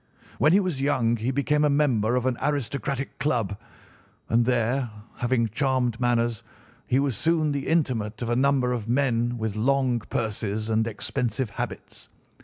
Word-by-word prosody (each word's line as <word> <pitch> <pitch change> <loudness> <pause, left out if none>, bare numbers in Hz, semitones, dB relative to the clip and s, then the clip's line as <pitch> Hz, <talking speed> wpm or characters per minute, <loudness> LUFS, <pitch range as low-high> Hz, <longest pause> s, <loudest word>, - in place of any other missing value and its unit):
When 155 - +5
he 190 - +6
was 180 -9 -2
young 120 -5 +2
he 115 +3 -2
became 145 +3 +1
a 150 - +4
member 125 -6 +2
of 125 0 0
an 130 -1 +1
aristocratic 140 -1 -2
club, 115 -9 0 0.7
and 115 +1 +3
there, 125 +1 +1 0.3
having 120 -2 +1
charming 130 +1 0
manners, 120 -2 +1 0.5
he 130 - +2
was 135 -3 +1
soon 160 - +1
the 140 -1 -3
intimate 120 -10 0
of 115 - -3
a - - +2
number 130 -1 +2
of 115 -2 -4
men 120 -2 +1
with 110 -2 -3
long 130 +1 +2
purses 110 -1 -3
and 110 +1 +2
expensive 115 +1 -2
habits. - - -6
125 Hz, 160 wpm, -25 LUFS, 115-140 Hz, 0.7 s, he